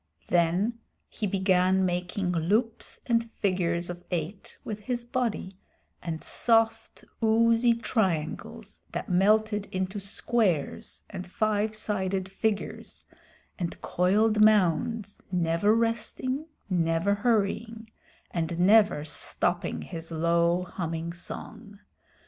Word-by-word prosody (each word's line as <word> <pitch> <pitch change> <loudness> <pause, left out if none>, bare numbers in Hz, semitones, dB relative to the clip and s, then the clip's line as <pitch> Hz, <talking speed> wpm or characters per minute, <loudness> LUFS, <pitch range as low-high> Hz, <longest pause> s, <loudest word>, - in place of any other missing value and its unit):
Then 180 +7 +2 0.3
he 210 - -3
began 190 -1 +2
making 180 +1 -1
loops 210 +8 0
and 230 -1 +1
figures 175 -3 0
of 175 0 -7
eight 175 +3 -4
with 215 -1 -5
his 240 +3 -3
body, 235 -7 -2 0.4
and 165 -2 -5
soft, 225 -1 +1 0.2
oozy 230 +1 +4
triangles 185 - -2
that - - -4
melted 210 +3 +3
into 190 +2 -3
squares 195 -4 -1
and 190 -2 -6
five 215 +2 0
sided 190 -3 -2
figures, 210 +1 -3 0.5
and 170 -2 -3
coiled 210 +4 +2
mounds, 210 +1 +3
never 170 +2 +2
resting, 235 +5 -1 0.2
never 170 +1 +1
hurrying, 220 +1 -1 0.4
and 165 -1 -2
never 200 -5 +5
stopping 175 +3 -1
his 165 -2 -6
low 170 +2 +2
humming 165 -2 -4
song. 200 +3 -8
195 Hz, 100 wpm, -27 LUFS, 175-220 Hz, 0.5 s, never